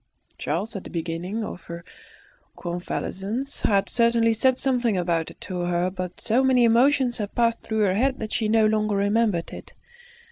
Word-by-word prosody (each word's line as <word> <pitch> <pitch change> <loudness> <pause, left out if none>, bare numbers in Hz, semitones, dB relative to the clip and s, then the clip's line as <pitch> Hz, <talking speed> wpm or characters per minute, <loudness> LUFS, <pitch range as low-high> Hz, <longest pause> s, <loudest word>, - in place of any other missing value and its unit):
Charles, 195 +10 -2
at 195 - -5
the - - -9
beginning 175 +6 -4
of 190 - -6
her 170 0 -8 0.7
convalescence, 195 +8 -4
had 200 -2 +2
certainly 230 +1 +3
said 255 +3 +2
something 245 -6 +1
about 170 -2 0
it - - -15
to 185 -2 -5
her, 175 +1 0
but 180 -1 -6
so 245 +4 +1
many 260 -2 +4
emotions 245 +2 +3
had 205 -1 -4
passed 230 -1 +1
through 220 -1 -2
her 195 -3 +3
head 260 +6 +1
that 220 -1 -5
she 215 -2 0
no 220 0 +4
longer 215 -1 +1
remembered 205 -3 +1
it. - - -10
215 Hz, 175 wpm, -24 LUFS, 180-235 Hz, 0.7 s, many